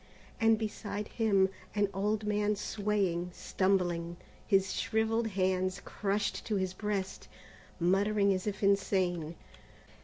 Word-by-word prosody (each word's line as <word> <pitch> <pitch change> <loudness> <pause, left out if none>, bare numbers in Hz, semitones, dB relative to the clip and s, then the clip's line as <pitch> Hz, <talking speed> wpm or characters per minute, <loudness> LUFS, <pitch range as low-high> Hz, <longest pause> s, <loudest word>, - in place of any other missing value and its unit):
and 225 -1 +5
beside 210 -1 -4
him, 200 -4 +3 0.3
an 205 -1 +3
old 210 +2 0
man 210 0 +1
swaying, 200 -4 -1
stumbling, 175 -3 0 0.3
his 195 -2 +3
shrivelled 225 +1 0
hands 185 -2 0
crushed 205 0 -1
to 215 - -2
his 190 -2 -1
breast, 195 -1 -3 0.5
muttering 200 +3 +3
as 185 +2 -3
if 205 0 -3
insane. 185 -4 +1
200 Hz, 115 wpm, -31 LUFS, 185-210 Hz, 0.5 s, and